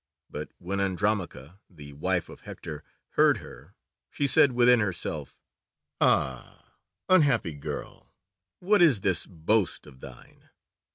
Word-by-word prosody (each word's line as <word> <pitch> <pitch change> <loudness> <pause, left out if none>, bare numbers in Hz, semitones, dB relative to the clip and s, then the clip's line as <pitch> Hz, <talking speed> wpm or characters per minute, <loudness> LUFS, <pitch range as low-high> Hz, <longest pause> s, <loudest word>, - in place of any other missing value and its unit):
But - - -7
when 95 +3 -4
Andromache, 95 -6 -2 0.2
the 75 -6 -12
wife 90 +4 -1
of - - -13
Hector, 75 -1 -9 0.3
heard - - +3
her - - -14 0.3
she 145 - -2
said 140 -1 +4
within 125 0 +5
herself, 100 -5 -3 0.6
"Ah, 65 -1 -1 0.3
unhappy 140 - +3
girl, 70 - -8 0.5
what 200 +2 +2
is 140 - +5
this 95 -3 +1
boast 95 +3 0
of 65 - -16
thine! - - -14
95 Hz, 120 wpm, -27 LUFS, 80-120 Hz, 0.6 s, within